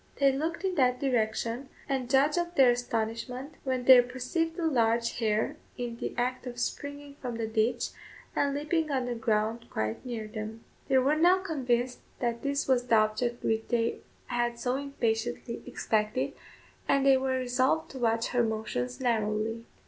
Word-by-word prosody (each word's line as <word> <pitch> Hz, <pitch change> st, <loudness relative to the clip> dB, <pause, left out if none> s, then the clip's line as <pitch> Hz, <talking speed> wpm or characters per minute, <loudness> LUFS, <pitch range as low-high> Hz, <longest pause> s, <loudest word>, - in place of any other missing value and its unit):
They 275 Hz, -1 st, +4 dB
looked 320 Hz, +6 st, -2 dB
in 380 Hz, -1 st, 0 dB
that 250 Hz, -2 st, +3 dB
direction, 235 Hz, 0 st, 0 dB, 0.2 s
and 265 Hz, -3 st, -1 dB
judge 275 Hz, +3 st, +4 dB
of 345 Hz, 0 st, -1 dB
their 260 Hz, -3 st, +7 dB
astonishment, 245 Hz, +3 st, -3 dB
when 260 Hz, -2 st, -1 dB
they 255 Hz, -1 st, +10 dB
perceived 260 Hz, +7 st, -2 dB
a 340 Hz, -, -1 dB
large 235 Hz, -6 st, +2 dB
hare 215 Hz, -2 st, 0 dB, 0.2 s
in 240 Hz, -1 st, -4 dB
the -, -, -4 dB
act 255 Hz, +1 st, -1 dB
of 245 Hz, 0 st, -6 dB
springing 285 Hz, +2 st, -4 dB
from 245 Hz, -3 st, -4 dB
the 225 Hz, -1 st, -2 dB
ditch, 220 Hz, +1 st, 0 dB, 0.5 s
and 280 Hz, -1 st, +1 dB
leaping 310 Hz, +2 st, 0 dB
on 260 Hz, -2 st, 0 dB
the 245 Hz, -, -2 dB
ground 225 Hz, 0 st, 0 dB
quite 110 Hz, 0 st, -2 dB
near 230 Hz, -4 st, -4 dB
them. 220 Hz, +1 st, -6 dB, 0.2 s
They 265 Hz, -, +4 dB
were 270 Hz, +4 st, +3 dB
now 350 Hz, +4 st, +6 dB
convinced 250 Hz, -7 st, 0 dB, 0.2 s
that 235 Hz, -1 st, -1 dB
this 280 Hz, 0 st, -1 dB
was 250 Hz, -2 st, +2 dB
the 230 Hz, -, +4 dB
object 220 Hz, +3 st, +1 dB
which 225 Hz, 0 st, 0 dB
they 230 Hz, -1 st, 0 dB, 0.3 s
had 240 Hz, -1 st, -1 dB
so 245 Hz, +2 st, -1 dB
impatiently 240 Hz, -4 st, -2 dB
expected, 220 Hz, 0 st, 0 dB, 0.5 s
and 275 Hz, -1 st, +3 dB
they 270 Hz, -1 st, +7 dB
were 260 Hz, 0 st, 0 dB
resolved 255 Hz, +5 st, +1 dB
to 265 Hz, -, -7 dB
watch 230 Hz, -1 st, +1 dB
her 245 Hz, -, +2 dB
motions 215 Hz, -, -2 dB
narrowly. 225 Hz, -1 st, 0 dB
245 Hz, 170 wpm, -29 LUFS, 230-270 Hz, 0.5 s, they